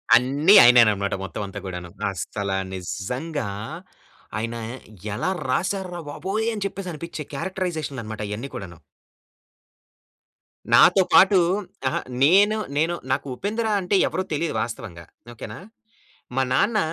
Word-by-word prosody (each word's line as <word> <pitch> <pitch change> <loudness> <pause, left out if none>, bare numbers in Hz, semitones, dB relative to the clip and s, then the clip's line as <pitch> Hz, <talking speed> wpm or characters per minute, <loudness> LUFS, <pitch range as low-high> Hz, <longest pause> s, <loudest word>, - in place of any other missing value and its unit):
అన్నీ 140 - +5
ఆయనేననమాట 110 -5 +5
మొత్తవంతా 100 +1 -5
కూడాను. 90 -2 -6 0.2
అస్సలా 100 +1 -3
నిజ్జంగా 100 - -4 0.9
"ఆయన 115 +1 -3 0.6
ఎలా 185 - -1 0.2
రాశారు 185 +7 -1
రా 175 - -5
బాబోయ్!" 195 +9 -2
అని 210 -2 -3
చెప్పేసనిపిచ్చె 170 -5 -5
క్యారెక్టరైజేషన్లనమాట 145 - -4
అయన్నీ 115 +7 -5
కూడాను! 90 -4 -8 1.9
నాతో 180 +11 +7
పాటూ 190 0 +7 0.5
అహ! 130 - 0 0.3
నేను, 205 +7 +5 0.2
నేను 165 +3 +2 0.2
నాకు 135 - -1
'ఉపేంద్ర' 220 - -2
అంటే 185 +2 0
ఎవరో 185 +4 -2
తెలీదు 160 +2 -1
వాస్తవంగా. 90 -7 -6 0.3
ఓకే 115 - -8
నా? - - -9 0.8
మా 135 - +3
నాన్న 215 - +2
145 Hz, 110 wpm, -23 LUFS, -, 1.9 s, నాతో